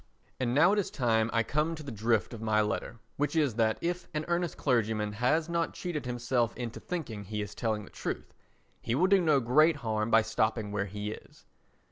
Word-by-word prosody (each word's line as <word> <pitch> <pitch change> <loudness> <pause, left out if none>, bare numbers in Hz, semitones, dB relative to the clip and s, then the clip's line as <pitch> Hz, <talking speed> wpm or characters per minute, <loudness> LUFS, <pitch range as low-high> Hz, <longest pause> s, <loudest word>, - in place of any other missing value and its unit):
And 125 -1 0
now 170 +7 +6
it 210 - +2
is 200 - -1
time 115 -3 +1
I 115 -1 +2
came 150 +7 0
to 155 - -9
the 140 - -6
drift 110 +1 0
of 115 - -7
my 110 -1 +2
letter, 105 +2 -1 0.2
which 145 +3 0
is 150 -6 +2
that 110 -1 +1
if 175 +1 -2
"An 150 0 -1
Earnest 175 -1 -1
Clergyman" 110 -5 +1
has 130 +9 +1
not 170 -1 -1
cheated 155 -7 -4
himself 120 -1 0
into 120 -2 -5
thinking 125 - -5
he 105 +2 -4
is 105 0 -4
telling 110 -3 -1
the - - -13
truth, - - -5 0.5
he 115 - -1
will 170 +7 +3
do 195 0 +5
no 155 -5 +4
great 150 +7 +4
harm 110 -4 -1
by 115 -1 +5
stopping 110 -1 0
where 100 -1 -1
he 105 +2 -4
is. - - -12
120 Hz, 210 wpm, -30 LUFS, 110-155 Hz, 0.5 s, now